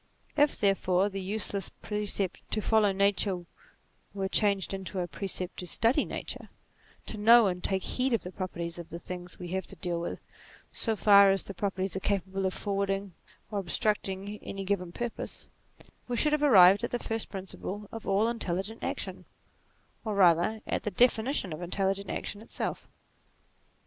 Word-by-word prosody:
If, 290 0 +4
therefore, 195 -1 +2
the 195 -1 -4
useless 200 0 -2
precept 205 -3 -2
to 220 - 0
follow 215 -1 +3
nature 195 -2 +1 0.7
were 195 -1 -1
changed 200 -1 +1
into 190 0 -4
a 175 - -1
precept 185 -1 -4
to 180 - -5
study 235 - +2
nature; - - -6 0.6
to 215 - -5
know 230 +2 +7
and 180 -2 -1
take 190 -1 0
heed 260 +1 0
of 230 - +1
the 180 - -6
properties 170 -3 -4
of 170 - -8
the 170 - -5
things 180 +1 -8
we 175 -1 -7
have 190 0 -3
to - - -10
deal 175 -3 -2
with, 170 - -4 0.5
so 225 -2 -1
far 200 -1 +7
as 195 0 +3
these 195 - -8
properties 195 0 -2
are - - -1
capable 195 0 -1
of 185 - -2
forwarding 195 -1 -2 0.4
or 205 - -1
ob 190 - -6
structing 205 +1 0
any 195 0 -5
given 185 -3 -1
purpose; 240 +4 -5 0.6
we 245 -1 -2
should 300 +3 +3
have 300 - +2
arrived 200 -7 +7
at 235 - 0
the 245 - -1
first 225 -2 -3
principle 195 +1 -6
of 225 -1 -8
all 200 +3 +3
intelligent 220 -1 -3
action, - - -4 0.8
or 215 -2 -2
rather 180 +3 +4
at - - -1
the - - -2
definition 235 - +2
of 155 - -7
intelligent 195 +2 -1
action 205 - -4
itself. 225 - -4
195 Hz, 170 wpm, -29 LUFS, 185-215 Hz, 0.8 s, know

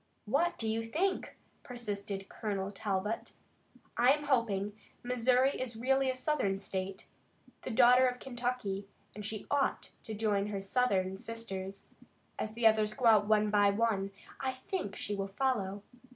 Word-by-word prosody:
"What 295 +10 +1
do 225 - -2
you 225 +1 0
think?" 375 +9 0 0.3
persisted 205 -5 -5
Colonel 200 -2 -3
Talbot. 205 +1 -2 0.6
"I 245 +2 +5
am 295 0 -3
hoping. 210 -7 +1 0.3
Missouri 250 +2 +3
is 245 -3 -2
really 265 +3 +2
a 260 - 0
Southern 255 -8 0
state, 190 0 -4 0.6
the - - -5
daughter 250 +2 +6
of 250 0 -1
Kentucky, 240 -6 -3 0.3
and 210 - -7
she 215 0 -4
ought 280 -1 0
to 220 - -5
join 205 -2 +1
her 205 -1 -3
Southern 195 -3 +1
sisters. 195 -4 -6 0.5
As 215 0 -3
the 235 0 -1
others 215 -1 +4
go 250 - -2
out 215 -3 +6
one 210 -1 +3
by 205 -1 +5
one, 200 -2 +1 0.3
I 260 -1 -1
think 260 - -4
she 205 - -3
will 195 -1 -2
follow. 200 -3 -1
220 Hz, 150 wpm, -32 LUFS, 200-250 Hz, 0.6 s, daughter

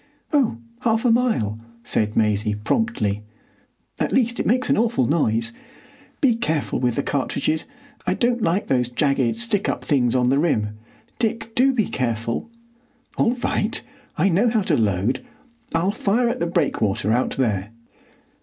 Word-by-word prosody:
"Oh, 270 - +2 0.2
half 225 +1 +1
a 240 - +5
mile," 220 - +1 0.2
said 105 0 0
Maisie, 105 -1 +2
promptly. 105 - 0 0.8
"At - - 0
least 240 -2 +1
it - - 0
makes 250 +3 +2
an - - +3
awful 230 - +2
noise. 115 -6 +1 0.7
Be 255 -6 +4
careful 160 -11 -1
with 125 -2 +1
the 140 - 0
cartridges; 145 +3 -1 0.4
I - - +2
don't 240 0 +1
like 180 +3 +1
those 125 -2 +1
jagged 135 -1 +1
stick 230 -4 0
up - - -3
things 130 -5 +2
on 125 -1 +3
the 135 +2 +3
rim. 105 -10 0 0.4
Dick, 225 -1 -2
do 265 +3 +4
be 230 -6 +1
careful." 115 - -2 0.7
"All 235 - +2
right. 220 +3 0 0.4
I 175 - +3
know 200 +6 +3
how 220 -3 +1
to 165 - +2
load. 105 +1 0 0.5
I'll 175 +4 +2
fire 225 +3 +1
at - - -2
the 170 - 0
breakwater 110 - 0
out 125 +2 0
there." 105 -6 0
155 Hz, 155 wpm, -22 LUFS, -, 0.8 s, a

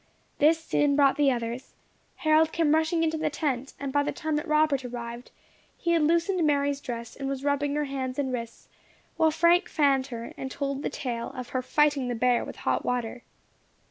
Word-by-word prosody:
This 315 +3 +5
soon 290 -3 +2
brought 275 -1 +4
the 290 -2 +3
others. 240 +1 -4 0.4
Harold 310 0 +3
came 320 -3 +2
rushing 320 +1 +2
into 320 -1 0
the 310 0 0
tent, 275 -3 -2
and 275 -1 -4
by 285 - +3
the 285 - -1
time 315 -1 -3
that 300 - -4
Robert 305 -3 +2
arrived, 240 0 -7 0.5
he 340 - -1
had 335 -1 +3
loosened 340 +3 +2
Mary's 285 -1 +1
dress, 235 -2 -6
and 275 -1 -4
was 275 -1 -4
rubbing 285 0 0
her 300 - +1
hands 260 -2 -4
and 265 -3 -1
wrists, 235 -1 -6 0.5
while 320 - +4
Frank 340 +4 +3
fanned 275 -3 +2
her, 235 -3 -7
and 265 - -5
told 275 0 -3
the - - -2
tale 235 -3 -4
of 250 -1 -6
her 255 - -1
fighting 290 0 +2
the 245 - -2
bear 245 +1 +2
with - - -8
hot - - +1
water. 245 -1 -2
280 Hz, 200 wpm, -27 LUFS, 255-310 Hz, 0.5 s, This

